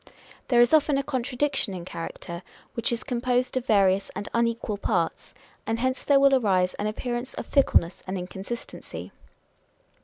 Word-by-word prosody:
There 245 Hz, -3 st, +4 dB
is 240 Hz, +4 st, +5 dB
often 300 Hz, -2 st, +4 dB
a 275 Hz, -, 0 dB
contradiction 260 Hz, -4 st, -1 dB
in 175 Hz, -1 st, -7 dB
character, 170 Hz, 0 st, -6 dB, 0.3 s
which 230 Hz, 0 st, +1 dB
is 235 Hz, -, -2 dB
composed 250 Hz, 0 st, 0 dB
of 255 Hz, 0 st, -2 dB
various 195 Hz, -2 st, +3 dB
and 205 Hz, -, -4 dB
unequal 230 Hz, -2 st, 0 dB
parts; -, -, -1 dB, 0.3 s
and 225 Hz, 0 st, 0 dB
hence 255 Hz, +2 st, -1 dB
there 280 Hz, -1 st, +5 dB
will 275 Hz, 0 st, +5 dB
arise 190 Hz, -8 st, +3 dB
an 210 Hz, -, -3 dB
appearance 240 Hz, +3 st, -3 dB
of -, -, -5 dB
fickleness 190 Hz, -, +2 dB
and 190 Hz, +1 st, -2 dB
inconsistency. 190 Hz, +6 st, -7 dB
235 Hz, 155 wpm, -26 LUFS, 195-260 Hz, 0.3 s, is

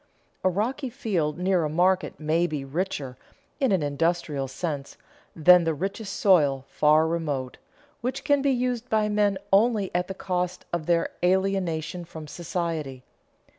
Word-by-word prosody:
A 185 Hz, -, +4 dB
rocky 245 Hz, -, -2 dB
field 185 Hz, -, -1 dB
near 180 Hz, -1 st, +1 dB
a 155 Hz, -, -1 dB
market 180 Hz, +4 st, +1 dB
may 160 Hz, +3 st, +1 dB
be 150 Hz, -4 st, -4 dB
richer, 140 Hz, -4 st, -3 dB, 0.4 s
in 270 Hz, -5 st, +2 dB
an 185 Hz, -5 st, +2 dB
industrial 145 Hz, -1 st, -1 dB
sense, 140 Hz, 0 st, -5 dB, 0.4 s
than 175 Hz, +2 st, +7 dB
the 165 Hz, -1 st, 0 dB
richest 195 Hz, +5 st, -4 dB
soil 145 Hz, -9 st, +3 dB
far 155 Hz, +1 st, +4 dB
remote, 150 Hz, -6 st, -2 dB, 0.4 s
which 260 Hz, +3 st, -3 dB
can 285 Hz, -2 st, +3 dB
be 280 Hz, -, +2 dB
used 250 Hz, -2 st, -1 dB
by 215 Hz, -1 st, +2 dB
men 205 Hz, -2 st, +2 dB, 0.2 s
only 210 Hz, -1 st, +3 dB
at 180 Hz, 0 st, 0 dB
the 190 Hz, -, -6 dB
cost 180 Hz, -1 st, -3 dB
of 170 Hz, -3 st, -2 dB
their 170 Hz, -1 st, +2 dB
alienation 180 Hz, -2 st, 0 dB
from 160 Hz, -2 st, -9 dB
society. 160 Hz, -5 st, -4 dB
175 Hz, 150 wpm, -26 LUFS, 155-195 Hz, 0.4 s, than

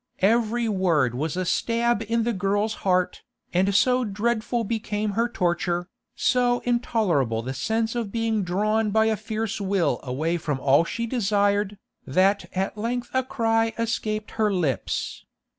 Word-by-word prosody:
Every 230 Hz, +2 st, +2 dB
word 170 Hz, -, +2 dB
was 150 Hz, +7 st, -2 dB
a 185 Hz, -, -1 dB
stab 235 Hz, +4 st, +1 dB
in 230 Hz, +1 st, +1 dB
the 235 Hz, +1 st, 0 dB
girl's 205 Hz, +3 st, 0 dB
heart, 185 Hz, -1 st, +1 dB, 0.3 s
and 190 Hz, +2 st, +2 dB
so 250 Hz, +4 st, +4 dB
dreadful 230 Hz, +2 st, -1 dB
became 215 Hz, -1 st, -2 dB
her 230 Hz, +4 st, 0 dB
torture, 175 Hz, -2 st, -1 dB, 0.3 s
so 245 Hz, -1 st, +2 dB
intolerable 180 Hz, -, 0 dB
the 130 Hz, +2 st, -4 dB
sense 220 Hz, -, -1 dB
of 230 Hz, -4 st, -3 dB
being 225 Hz, -1 st, 0 dB
drawn 210 Hz, +4 st, +1 dB
by 220 Hz, +1 st, +3 dB
a 220 Hz, 0 st, +2 dB
fierce 220 Hz, 0 st, -3 dB
will 195 Hz, -3 st, +1 dB
away 155 Hz, +7 st, -1 dB
from 150 Hz, -4 st, -2 dB
all 140 Hz, +5 st, +4 dB
she 230 Hz, +6 st, -3 dB
desired, 205 Hz, -3 st, +1 dB, 0.3 s
that 190 Hz, +8 st, +2 dB
at 195 Hz, +2 st, -2 dB
length 240 Hz, +2 st, -2 dB
a 260 Hz, -, +3 dB
cry 225 Hz, -3 st, +1 dB
escaped 215 Hz, -2 st, -2 dB
her 215 Hz, -2 st, +1 dB
lips. 165 Hz, -9 st, -2 dB
210 Hz, 150 wpm, -25 LUFS, 185-230 Hz, 0.3 s, so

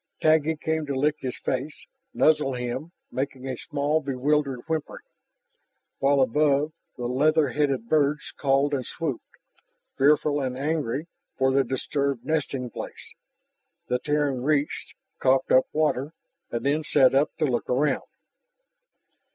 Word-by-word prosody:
Taggi 160 Hz, 0 st, +3 dB
came 160 Hz, 0 st, -2 dB
to 140 Hz, -, -2 dB
lick 150 Hz, +3 st, +1 dB
his 130 Hz, -2 st, -4 dB
face, 130 Hz, +4 st, -4 dB, 0.3 s
nuzzle 150 Hz, -4 st, +3 dB
him, 125 Hz, +6 st, -4 dB, 0.2 s
making 135 Hz, 0 st, -4 dB
a 130 Hz, -, -2 dB
small, 150 Hz, +3 st, -1 dB
bewildered 140 Hz, -1 st, 0 dB
whimpering. 160 Hz, -2 st, -3 dB, 0.9 s
While 140 Hz, 0 st, +3 dB
above, 145 Hz, +3 st, +2 dB, 0.3 s
the 120 Hz, -, -4 dB
leather 145 Hz, +4 st, +3 dB
headed 135 Hz, -4 st, 0 dB
birds 150 Hz, 0 st, +1 dB
called 140 Hz, +1 st, +1 dB
and 135 Hz, -2 st, 0 dB
swooped, 145 Hz, -2 st, -3 dB, 0.8 s
fearful 145 Hz, +1 st, +3 dB
and 130 Hz, -1 st, -3 dB
angry 145 Hz, -1 st, -1 dB, 0.3 s
for 130 Hz, 0 st, +3 dB
their 135 Hz, 0 st, +4 dB
disturbed 135 Hz, 0 st, -2 dB
nesting 135 Hz, -5 st, -1 dB
place. -, -, -8 dB, 0.8 s
The 125 Hz, -, +1 dB
Terran 145 Hz, -2 st, 0 dB
retched, 145 Hz, +1 st, -1 dB, 0.2 s
coughed 130 Hz, 0 st, +2 dB
up 130 Hz, -, +5 dB
water, 150 Hz, -1 st, 0 dB, 0.4 s
and 120 Hz, -, -4 dB
then 150 Hz, +3 st, +1 dB
sat 130 Hz, -3 st, +4 dB
up 140 Hz, +3 st, +3 dB
to 160 Hz, -, +1 dB
look 125 Hz, -4 st, -1 dB
around. 140 Hz, +4 st, +1 dB
140 Hz, 135 wpm, -26 LUFS, 130-150 Hz, 0.9 s, up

